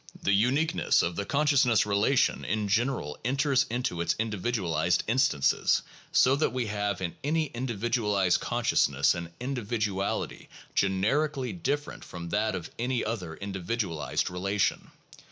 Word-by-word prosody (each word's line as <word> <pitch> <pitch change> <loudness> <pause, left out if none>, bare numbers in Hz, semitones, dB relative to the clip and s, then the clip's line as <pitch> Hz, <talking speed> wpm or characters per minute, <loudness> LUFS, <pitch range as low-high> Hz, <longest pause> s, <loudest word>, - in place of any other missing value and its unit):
The 100 - +1
uniqueness 140 - +2
of 85 0 -1
the 100 - -3
consciousness 140 -7 +3
relation 105 +6 +2
in 110 -1 -1
general 110 - 0
enters 135 +2 +2
into 120 -8 -2
its 85 - +1
individualized 95 -7 0
instances, 115 - +2 0.3
so 130 +2 +5
that 155 - +2
we 125 -2 -1
have 105 -2 -2
in 85 -2 -3
any 155 +1 0
indi 120 -1 -3
vidualized 105 -5 +1
consciousness 70 0 +2
an 85 -1 -6
individuality 110 -6 -2 0.2
generically 130 - +1
different 145 -4 -3
from 85 -1 -8
that 105 +1 0
of 85 -3 -6
any 125 +1 0
other 90 -8 -4
individualized 95 -3 -2
relation. 100 +2 -1
110 Hz, 130 wpm, -28 LUFS, 95-130 Hz, 0.3 s, so